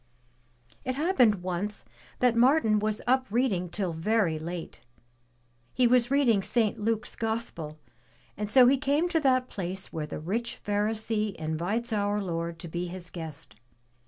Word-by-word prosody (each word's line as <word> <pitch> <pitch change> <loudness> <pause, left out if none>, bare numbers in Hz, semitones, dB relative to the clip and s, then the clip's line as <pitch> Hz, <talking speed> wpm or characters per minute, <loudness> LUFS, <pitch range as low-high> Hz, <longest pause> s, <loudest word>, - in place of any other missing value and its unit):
It 255 0 -2
happened 255 - +3
once 185 +3 -3 0.4
that 250 -2 +4
Martin 235 -3 +4
was 215 0 -1
up 260 +2 +2
reading 205 -6 0
till 185 -1 -2
very 170 -1 +1
late. 170 +1 -6 0.9
He 255 - +4
was 245 0 +4
reading 260 -7 +3
St. 220 +1 0
Luke's 220 0 -1
Gospel 220 -9 -4 0.6
and 210 0 -4
so 255 +3 +7
he 270 +3 +5
came 295 +4 +1
to 335 -2 +2
that 255 -3 +2
place 190 -2 -5
where 155 -2 -3
the - - -5
rich 220 +9 -3
Pharisee 210 0 0
invites 175 +10 -2
our 205 0 +1
Lord 170 -3 -3
to - - -6
be 175 +2 -3
his 180 0 -7
guest. 160 -9 -9
210 Hz, 150 wpm, -28 LUFS, 175-245 Hz, 0.9 s, so